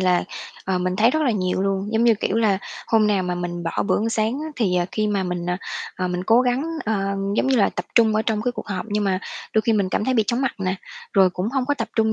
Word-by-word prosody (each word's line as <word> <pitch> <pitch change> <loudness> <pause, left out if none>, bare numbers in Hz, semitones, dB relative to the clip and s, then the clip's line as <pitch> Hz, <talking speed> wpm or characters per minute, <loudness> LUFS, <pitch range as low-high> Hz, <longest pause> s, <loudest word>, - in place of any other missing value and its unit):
là, 180 -1 +2 0.4
ờ, 190 -1 0
mình 180 0 -1
thấy 225 +4 +5
rất 315 +3 +1
là 260 - +3
nhiều 185 -3 0
luôn. 195 +1 -1
Giống 225 +1 +2
như, 235 -1 +6
kiểu 210 0 -1
là, 215 -4 +3 0.3
hôm 220 -2 +3
nào 205 -3 +2
mà 180 -1 -2
mình 175 0 -4
bỏ 165 - -1
bữa - - +2
ăn 220 - 0
sáng 225 +4 0
á 310 - -4
thì, 195 -7 +1
ờ, 175 -1 +1
khi 215 -1 0
mà 205 -2 0
mình, 180 -1 -3
ờ, 180 - 0 0.4
ờ, 185 -1 -1
mình 180 0 -3
cố 225 +4 +5
gắng, 250 +1 +1 0.2
ơ, 220 0 0 0.4
giống - - +2
như 265 - +3
là 210 - +4
tập - - -4
trung 225 -2 +5
ở 215 - +2
trong 220 -1 -1
cái 245 +1 0
cuộc - - -7
họp 195 +1 -3
nhưng 210 0 0
mà 190 -2 +1 0.4
đôi 220 - +4
khi 230 - +2
mình 200 -3 +1
cảm 205 - 0
thấy 260 - +1
bị 220 -3 +3
chóng 240 +1 0
mặt 270 -2 0
nè, 190 -1 -1 0.4
rồi 190 -2 +5
cũng 180 +3 -2
hông 260 +1 -1
có 290 - +2
tập 230 -5 -3
trung 220 -1 +3
210 Hz, 290 wpm, -22 LUFS, 185-230 Hz, 0.4 s, như